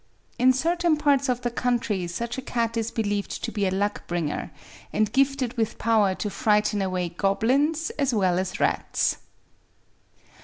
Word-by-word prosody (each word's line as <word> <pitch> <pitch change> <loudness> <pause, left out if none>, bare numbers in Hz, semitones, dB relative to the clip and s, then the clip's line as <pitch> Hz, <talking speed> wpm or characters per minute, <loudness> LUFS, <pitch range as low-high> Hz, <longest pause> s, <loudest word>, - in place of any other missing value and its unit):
In 255 +1 +6
certain 335 +4 +1
parts 285 -2 +2
of 250 -1 0
the 240 - -2
country 235 -6 -1
such 235 +9 -4
a - - -5
cat 235 -3 -1
is 225 -1 -1
believed 205 -3 -2
to - - -2
be 205 -3 0
a - - +2
luck 200 +2 -2
bringer, 170 -4 -2 0.4
and 215 -1 +1
gifted 270 -2 +1
with 225 -2 -1
power 215 -4 +2
to 210 - -3
frighten 210 -1 +2
away 185 -2 -1
goblins 265 - +1
as 280 -2 +2
well 185 -5 +2
as 190 +4 -3
rats. - - +1
225 Hz, 160 wpm, -25 LUFS, 200-260 Hz, 0.4 s, In